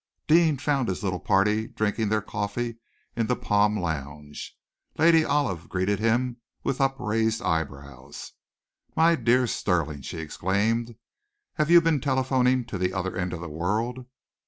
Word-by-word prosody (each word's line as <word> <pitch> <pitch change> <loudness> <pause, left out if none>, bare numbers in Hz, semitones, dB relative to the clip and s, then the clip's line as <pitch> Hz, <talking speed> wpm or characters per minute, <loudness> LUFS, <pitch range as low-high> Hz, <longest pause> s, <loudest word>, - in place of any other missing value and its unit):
Deane 160 -2 +4
found 140 -2 0
his 95 - -3
little 90 -3 -1
party 105 +5 +2
drinking 110 0 -1
their 110 -1 0
coffee 110 +3 -3 0.4
in 115 -2 0
the 125 - +1
palm 105 -1 +2
lounge. 75 -4 -5 0.4
Lady 165 0 +5
Olive 140 - -1
greeted 95 +2 0
him 120 +2 +1 0.3
with 135 +1 -1
upraised 115 -4 0
eyebrows. 70 -3 -4 0.6
"My 165 +1 +5
dear 125 -3 +3
Stirling!" 80 - -1
she - - -7
exclaimed. 105 +9 -1 0.6
"Have 155 -1 0
you 170 0 +8
been 160 -4 +1
telephoning 130 -2 +1
to 100 -4 -6
the 90 0 0
other 95 -1 -2
end 90 0 -2
of 85 - -5
the 85 - -6
world?" 110 +11 -2
110 Hz, 145 wpm, -26 LUFS, 90-130 Hz, 0.6 s, you